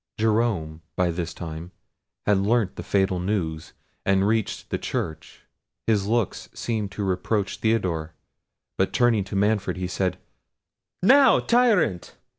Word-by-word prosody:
Jerome, 105 -8 0
by 90 -1 +1
this 85 -1 -3
time, 80 +1 -7 0.6
had 105 -2 +3
learnt 105 0 +1
the - - -5
fatal 95 -2 +1
news, 85 -5 -2 0.3
and 95 0 +2
reached 110 -1 -1
the - - -1
church. 80 0 -5 0.4
His 105 -3 +1
looks 115 -2 -1
seemed 110 -4 -2
to 105 - -3
reproach 95 +2 -1
Theodore, 85 -8 0 0.6
but 95 - +1
turning 120 -5 +3
to 100 - -6
Manfred, 105 0 +1
he 90 - -2
said, 90 +1 -1 0.9
"Now, 270 +6 +6
tyrant! 215 - +2
100 Hz, 130 wpm, -24 LUFS, 90-110 Hz, 0.9 s, Now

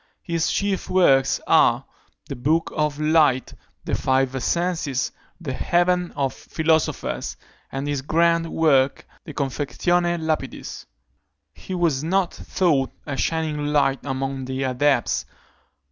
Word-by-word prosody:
His 165 -2 0
chief 200 -1 -1
works 135 -8 +4
are, - - +4 0.4
the 140 - -5
Book 155 +7 0
of 150 -1 0
Light, 150 -4 +3 0.3
the - - -3
Five 130 0 +1
Essences, 160 -2 -1 0.3
the 150 -7 -4
Heaven 175 +3 +1
of 135 -2 -1
Philosophers, 160 -1 -1 0.3
and 135 +2 -3
his 145 -2 -1
grand 165 +3 +2
work, 140 -4 +2 0.2
De 150 - -8
Confectione 175 +5 0
Lapidis. 160 -1 -4 0.7
He 185 - -7
was 160 -6 +1
not 185 +2 +1
thought 150 -8 0 0.2
a 145 - -3
shining 155 -1 -1
light 140 -2 +2
among 135 -1 -3
the 130 +1 -3
adepts. 130 -1 +1
150 Hz, 120 wpm, -23 LUFS, 135-170 Hz, 0.7 s, works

